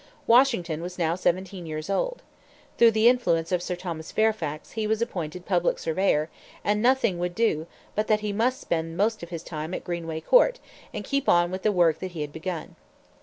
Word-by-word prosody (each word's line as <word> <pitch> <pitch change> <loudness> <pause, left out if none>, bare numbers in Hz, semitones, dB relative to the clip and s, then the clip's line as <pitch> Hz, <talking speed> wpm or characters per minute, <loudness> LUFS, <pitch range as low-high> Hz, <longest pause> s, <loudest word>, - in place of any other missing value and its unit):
Washington 230 - +3
was 180 +1 -6
now 165 -2 +1
seventeen 180 0 -1
years 155 0 -5
old. - - -1 0.6
Through 235 - +8
the 220 +1 +3
influence 180 -10 +2
of 180 -1 +1
Sir 180 0 -3
Thomas 170 -3 -6
Fairfax 185 -9 -1
he 220 -1 -2
was 220 0 +1
appointed 180 -6 -4
public 175 -3 +1
surveyor; 160 -2 +1 0.4
and 210 +1 +1
nothing 240 -7 +2
would 175 0 -2
do 195 -9 +1 0.3
but 215 +1 -1
that 215 -1 +2
he 210 -1 -2
must 240 +5 +1
spend 165 0 -2
the - - -9
most 220 +2 +1
of 170 - -8
his 170 -2 -6
time 160 +2 -5
at - - -5
Greenway 165 -2 -4
Court - - +4 0.3
and 210 -1 -6
keep 275 0 0
on 175 0 +4
with 185 0 -4
the 215 - +2
work 175 -5 +3
that 185 -1 -6
he 160 - -5
had 145 -1 -5
begun. 165 0 -5
180 Hz, 205 wpm, -26 LUFS, 165-220 Hz, 0.6 s, Through